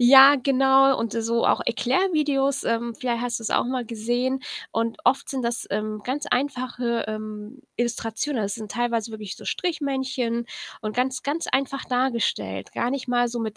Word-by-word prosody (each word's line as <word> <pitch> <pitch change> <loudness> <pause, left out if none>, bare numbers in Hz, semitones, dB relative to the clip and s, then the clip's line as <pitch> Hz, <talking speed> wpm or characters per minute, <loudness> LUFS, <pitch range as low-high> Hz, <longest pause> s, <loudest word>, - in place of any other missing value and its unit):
Ja, 270 +3 +9
genau. 270 0 +4
Und 230 -2 -2
so 230 0 0
auch - - +3
Erklärvideos, 280 +1 +1
ähm, 230 0 -1
vielleicht 240 -2 -2
hast 240 -1 -2
du's 225 - -4
auch - - +3
mal 255 0 -2
gesehen. 240 +4 -1 0.3
Und 230 +2 -1
oft 265 +3 +2
sind 265 -2 -2
das, 235 0 -2
ähm, 215 +1 -2
ganz 285 +4 -2
einfache, 250 -4 -1
ähm, 215 +3 -6 0.2
Illustrationen. 235 +2 -1
Also, 200 0 -1
es - - -2
sind 215 -2 -8
teilweise 235 -2 -1
wirklich 215 -3 -7
so - - -12
Strichmännchen 265 -8 -1 0.3
und 215 -1 -4
ganz, 255 0 0
ganz 295 +5 -2
einfach 275 0 0
dargestellt, 235 - -1
gar 240 - -1
nicht 265 -1 -3
mal 245 0 +2
so 240 0 -4
mit 220 -2 -4
245 Hz, 175 wpm, -24 LUFS, 230-265 Hz, 0.3 s, Ja